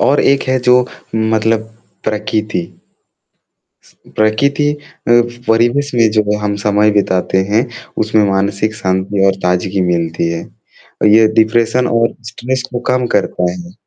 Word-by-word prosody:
और 145 - +3
एक 140 0 +2
है, 130 - +2
जो 125 0 +3 0.3
मतलब, 110 0 +1 0.4
प्रकिति 105 -2 -2 1.2
स - - -23 0.2
प्रकृति 140 +7 +1
अ, 150 - -9 0.7
परिवेश 120 +6 +2
में 115 -2 +4
जो 105 -1 +1
हम 105 -1 -2
समय 105 +1 +3
बिताते 95 -2 0
हैं, 110 +4 +2 0.4
उसमें 110 0 +2
मानसिक 100 +3 -1
शांति 95 -1 0
और 95 - +2
ताज़गी 90 +2 0
मिलती 85 0 -1
है। 85 - -4 0.7
ये 110 0 +6
डिप्रेशन 115 +3 +2
और 115 0 +1
स्ट्रेस 125 +3 -3
को 120 - -3
कम 125 -1 +1
करता 90 -3 0
है। 90 0 -9
110 Hz, 135 wpm, -15 LUFS, 100-120 Hz, 1.2 s, ये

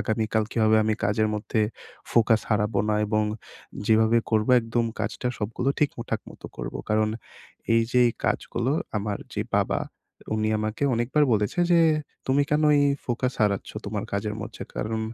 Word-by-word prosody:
আগামীকাল 110 +1 0
কিভাবে 110 -1 +3
আমি 110 - +1
কাজের 110 +1 +2
মধ্যে 110 +1 -1 0.5
ফোকাস 110 -1 +4
হারাবো 105 -1 +1
না? 105 - +2
এবং 110 0 +1 0.6
যেভাবে 110 +1 +4
করবো 110 +1 +2
একদম 115 +1 -1 0.2
কাজটা, 125 - -3
সবগুলো 115 +5 -2
ঠিকঠাক 115 -6 -1
মতো - - -10
করবো। - - -5
কারণ, 110 0 +2 0.7
এইযে 115 +2 +2
এই - - -2
কাজগুলো 120 +3 0 0.2
আমার 105 -1 -2 0.2
যে - - 0
বাবা, - - +1 0.5
উনি 110 0 0
আমাকে 110 +5 -3
অনেকবার 125 +6 +2
বলেছে 105 +9 0
যে, 170 - +6 0.5
"তুমি 135 +2 +3
কেন 150 +1 +2 0.2
এই 145 - +4 0.2
ফোকাস 125 +1 -1
হারাচ্ছ 100 -2 0 0.2
তোমার - - -3
কাজের 105 +1 -2
মাঝে?" - - -8
কারণ 110 +1 -2
110 Hz, 150 wpm, -25 LUFS, 105-120 Hz, 0.7 s, যে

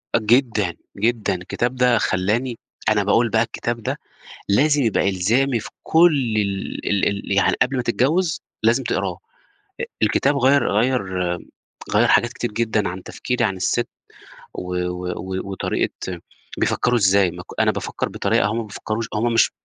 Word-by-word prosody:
أ - - +4
جدًا، 110 -5 +2 0.2
جدًا، 110 -2 +1
الكتاب 120 +7 -2
ده 125 -2 +3
خلّاني 110 +6 0 0.3
أنا 105 -1 +3
باقول 115 +3 +3
بقى 110 - +2
الكتاب 115 0 -4
ده - - -2 0.5
لازم 145 +7 +3
يبقى 110 -3 +2
إلزامي 115 +7 +1
في - - -8
كل 150 -8 +4
ال 100 -2 -2
ال 100 -1 +2
ال 100 0 -5
يعني 100 0 +3
قبل 130 +1 +2
ما - - +1
تتجوّز 155 +9 +1 0.2
لازم 120 +4 +3
تقراه 95 -7 -2 0.6
أ - - 0 0.2
الكتاب 135 +6 +2
غيّر 140 -1 +3
غيّر 120 +3 +2 0.9
غيّر - - +4
حاجات 120 +1 +3
كتير 120 -3 -4
جدًا 110 -3 0
عن 90 +1 -6
تفكيري 125 -1 -2
عن 95 -3 0
الست 120 +6 0 0.7
و 90 0 -5
و 90 0 -4
و 95 +1 -5
وطريقة 90 -1 -3 0.4
بيفكّروا 125 0 +2
إزاي 95 -3 +4
ما 90 +1 -9
ك - - -4
أنا - - +3
بافكّر - - -3
بطريقة - - +1
هُم 110 +2 -2
ما 115 - -1
بيفكّروش 110 +2 -4
هُم 115 +2 +1
مش 115 - +4
115 Hz, 160 wpm, -21 LUFS, 100-125 Hz, 0.9 s, أ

